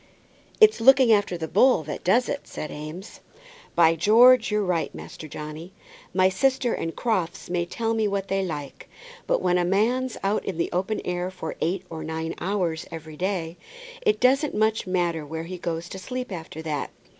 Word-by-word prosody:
"It's 435 Hz, -, +6 dB
looking 260 Hz, 0 st, +6 dB
after 205 Hz, -4 st, +1 dB
the 160 Hz, -1 st, -4 dB
bull 255 Hz, -2 st, +4 dB
that 150 Hz, -, -6 dB
does 235 Hz, +8 st, +3 dB
it," 285 Hz, -, -4 dB
said 155 Hz, -, -6 dB
Eames. 155 Hz, +7 st, -8 dB, 0.6 s
"By 165 Hz, -1 st, +5 dB
George! 230 Hz, +9 st, +6 dB
you're 210 Hz, -1 st, +1 dB
right, 175 Hz, -3 st, 0 dB
Master 155 Hz, -, -9 dB
Johnny. 155 Hz, +5 st, -8 dB, 0.4 s
My 185 Hz, +1 st, +4 dB
sister 245 Hz, +5 st, +1 dB
and 165 Hz, -, -3 dB
Crofts 185 Hz, -7 st, -2 dB
may 175 Hz, -1 st, 0 dB
tell 225 Hz, +4 st, -2 dB
me 220 Hz, -1 st, +1 dB
what 200 Hz, -1 st, -2 dB
they 195 Hz, 0 st, 0 dB
like, 150 Hz, -6 st, -6 dB, 0.4 s
but -, -, +1 dB
when 180 Hz, -1 st, +3 dB
a -, -, +2 dB
man's 230 Hz, +7 st, +1 dB
out 200 Hz, +2 st, 0 dB
in 185 Hz, -, -4 dB
the 170 Hz, -, -1 dB
open 190 Hz, +4 st, -1 dB
air 180 Hz, 0 st, -2 dB
for 180 Hz, -4 st, -6 dB
eight 175 Hz, +4 st, -1 dB
or 160 Hz, -1 st, -7 dB
nine 160 Hz, +1 st, -4 dB
hours 175 Hz, -4 st, -1 dB
every 160 Hz, -1 st, -9 dB
day, 180 Hz, -1 st, -2 dB, 0.4 s
it 430 Hz, -4 st, +2 dB
doesn't 275 Hz, +3 st, +3 dB
much 220 Hz, -1 st, +1 dB
matter 175 Hz, -3 st, 0 dB
where 160 Hz, +2 st, -5 dB
he 180 Hz, +2 st, -7 dB
goes 170 Hz, 0 st, -3 dB
to 190 Hz, -, -7 dB
sleep 250 Hz, +4 st, -5 dB
after 160 Hz, -2 st, -7 dB
that. 150 Hz, -2 st, -3 dB
185 Hz, 185 wpm, -25 LUFS, 165-220 Hz, 0.6 s, It's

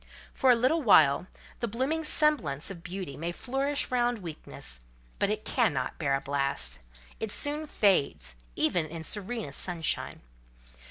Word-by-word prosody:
For 265 Hz, -, +2 dB
a 250 Hz, -, +8 dB
little 255 Hz, +8 st, +2 dB
while, 175 Hz, -, +5 dB, 0.3 s
the 235 Hz, -, -1 dB
blooming 265 Hz, +9 st, -1 dB
semblance 265 Hz, -, +2 dB
of 175 Hz, -4 st, -9 dB
beauty 180 Hz, -5 st, -6 dB
may 165 Hz, +5 st, -3 dB
flourish 270 Hz, +9 st, -1 dB
round 240 Hz, -4 st, +1 dB
weakness; 65 Hz, -, -6 dB, 0.4 s
but 200 Hz, -, +2 dB
it 215 Hz, 0 st, -2 dB
cannot 155 Hz, -, 0 dB
bear 140 Hz, -4 st, +1 dB
a 135 Hz, -, -2 dB
blast: 140 Hz, -, -1 dB, 0.4 s
it 220 Hz, -2 st, -3 dB
soon 300 Hz, +4 st, -1 dB
fades, 140 Hz, -, +2 dB, 0.2 s
even 160 Hz, 0 st, +1 dB
in 165 Hz, 0 st, -7 dB
serenest 205 Hz, -4 st, -3 dB
sunshine. 170 Hz, -3 st, -1 dB
195 Hz, 145 wpm, -29 LUFS, -, 0.4 s, a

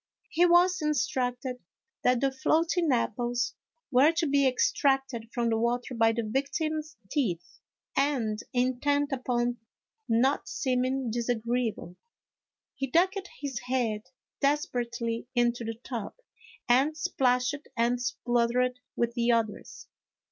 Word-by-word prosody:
He 350 Hz, +2 st, +4 dB
was 355 Hz, +1 st, +4 dB
instructed 250 Hz, -3 st, -1 dB, 0.4 s
that 250 Hz, -1 st, +3 dB
the 275 Hz, -1 st, +2 dB
floating 320 Hz, +3 st, +1 dB
apples 240 Hz, 0 st, 0 dB, 0.4 s
were 265 Hz, +5 st, +6 dB
to 335 Hz, 0 st, 0 dB
be 280 Hz, -2 st, +3 dB
extracted 260 Hz, -2 st, +1 dB
from 235 Hz, -1 st, 0 dB
the 225 Hz, -, +1 dB
water 245 Hz, +2 st, -1 dB
by 225 Hz, -1 st, +4 dB
the 230 Hz, +1 st, -2 dB
victim's 300 Hz, +6 st, -2 dB
teeth, 180 Hz, -, -2 dB, 0.4 s
and 240 Hz, -7 st, +1 dB
intent 270 Hz, +3 st, +1 dB
upon 245 Hz, -2 st, 0 dB, 0.5 s
not 250 Hz, +5 st, +2 dB
seeming 255 Hz, -1 st, 0 dB
disagreeable, 235 Hz, -5 st, -2 dB, 0.8 s
he 270 Hz, 0 st, -3 dB
ducked 375 Hz, +7 st, +1 dB
his 270 Hz, -4 st, -3 dB
head 245 Hz, -4 st, -1 dB, 0.4 s
desperately 240 Hz, -5 st, -1 dB
into 240 Hz, 0 st, +2 dB
the 225 Hz, 0 st, -4 dB
tub 235 Hz, -6 st, -5 dB, 0.5 s
and 270 Hz, +5 st, +3 dB
splashed 270 Hz, -4 st, 0 dB
and 240 Hz, +1 st, +1 dB
spluttered 245 Hz, +1 st, 0 dB, 0.2 s
with 235 Hz, 0 st, 0 dB
the 240 Hz, 0 st, +2 dB
others. 225 Hz, -3 st, -2 dB
250 Hz, 115 wpm, -28 LUFS, 235-280 Hz, 0.8 s, were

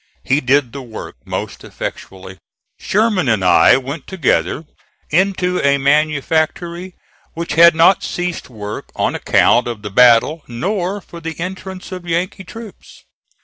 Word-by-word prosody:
He 140 Hz, +3 st, +1 dB
did 130 Hz, -1 st, +2 dB
the 140 Hz, -, -6 dB
work 115 Hz, -, -9 dB
most -, -, -5 dB
effectually. 95 Hz, 0 st, -8 dB, 0.4 s
Sherman 205 Hz, -, +1 dB
and 105 Hz, -5 st, +1 dB
I 90 Hz, -, +6 dB
went 135 Hz, +2 st, -6 dB
together 165 Hz, -2 st, 0 dB, 0.5 s
into 180 Hz, +1 st, +1 dB
a 140 Hz, 0 st, +3 dB
manufactory 155 Hz, +5 st, 0 dB, 0.4 s
which 170 Hz, +1 st, -4 dB
had 170 Hz, 0 st, +7 dB
not 170 Hz, +4 st, +5 dB
ceased 175 Hz, -4 st, -4 dB
work 105 Hz, -3 st, -7 dB
on -, -, 0 dB
account 120 Hz, -, +3 dB
of 115 Hz, -3 st, -6 dB
the 105 Hz, -, -6 dB
battle 125 Hz, +8 st, +5 dB
nor 185 Hz, -, -3 dB
for 170 Hz, -, -12 dB
the 165 Hz, -1 st, -6 dB
entrance 190 Hz, +1 st, -7 dB
of 180 Hz, -1 st, -7 dB
Yankee 180 Hz, +3 st, -2 dB
troops. 225 Hz, +1 st, -12 dB
160 Hz, 140 wpm, -17 LUFS, 125-180 Hz, 0.5 s, had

